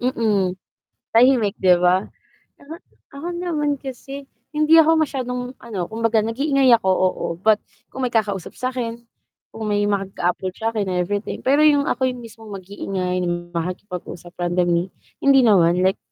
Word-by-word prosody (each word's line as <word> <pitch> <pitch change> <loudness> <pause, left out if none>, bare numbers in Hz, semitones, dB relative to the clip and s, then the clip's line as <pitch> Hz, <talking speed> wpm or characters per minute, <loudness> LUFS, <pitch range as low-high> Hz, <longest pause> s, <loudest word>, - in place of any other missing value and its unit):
Mm, 210 -7 0 0.6
tahimik, 230 -4 +4
'di 180 -2 +4
ba? 180 +2 +3 0.6
Uh-huh, 320 +4 -10 0.3
ako 285 +5 -7
naman 300 -5 -1
kasi, 270 +1 -8 0.2
hindi 305 +1 +4
ako 320 +1 +3
masyadong, 250 -4 -2 0.2
ano, 225 -5 -6
kumbaga 225 0 +1
nag-iingay 270 +2 +3
ako, 190 -4 -2
oo, 185 0 +1
but 215 +2 +3 0.3
kung 260 - -4
may 245 - -2
kakausap 200 -5 -1
sa 255 - -1
'kin, 235 -1 -5 0.5
kung 220 0 -6
may 205 0 +1
mag-a-approach 190 -2 -2
sa 225 +1 -1
'kin, 205 -3 -1
everything. 180 +4 -2
Pero 280 +3 +4
'yong 290 -2 +4
ako 260 -1 +1
'yong 250 -1 -7
mismong 225 -1 -12
mag-iingay 185 -1 -3 0.3
makipag-usap 180 0 -6
randomly, 175 0 0 0.3
hindi 275 -1 +6
naman, 180 -5 +4
like, 190 +2 +2
220 Hz, 145 wpm, -21 LUFS, 185-265 Hz, 0.6 s, hindi